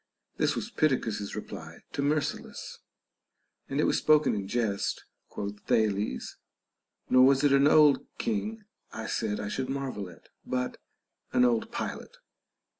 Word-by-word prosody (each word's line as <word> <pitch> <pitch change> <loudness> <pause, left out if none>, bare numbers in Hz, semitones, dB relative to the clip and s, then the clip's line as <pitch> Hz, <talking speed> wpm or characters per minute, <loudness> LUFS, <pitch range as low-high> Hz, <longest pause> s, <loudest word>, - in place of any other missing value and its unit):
This - - +2
was - - -4
Pittacus's 110 -9 0
reply 85 -6 -8
to - - -2
Myrsilus, 145 +1 -2 0.9
and - - -1
it - - +3
was - - +2
spoken 155 0 +4
in 100 -2 -3
jest, 105 -3 -1 0.2
quoth 100 0 -5
Thales; 105 - 0 0.7
nor 130 0 +7
was 135 +1 +5
it 145 -1 +5
an 140 +1 +6
old 150 -2 +5
king 220 -1 -2 0.3
I 110 - -6
said 105 -2 -1
I 105 - -3
should 130 +5 -3
mar 135 -1 -2
vel 100 -5 -6
at, 85 - -17
but 125 0 -3 0.5
an 125 - +5
old 120 -2 +1
pilot. - - -5
125 Hz, 145 wpm, -29 LUFS, 105-140 Hz, 0.9 s, nor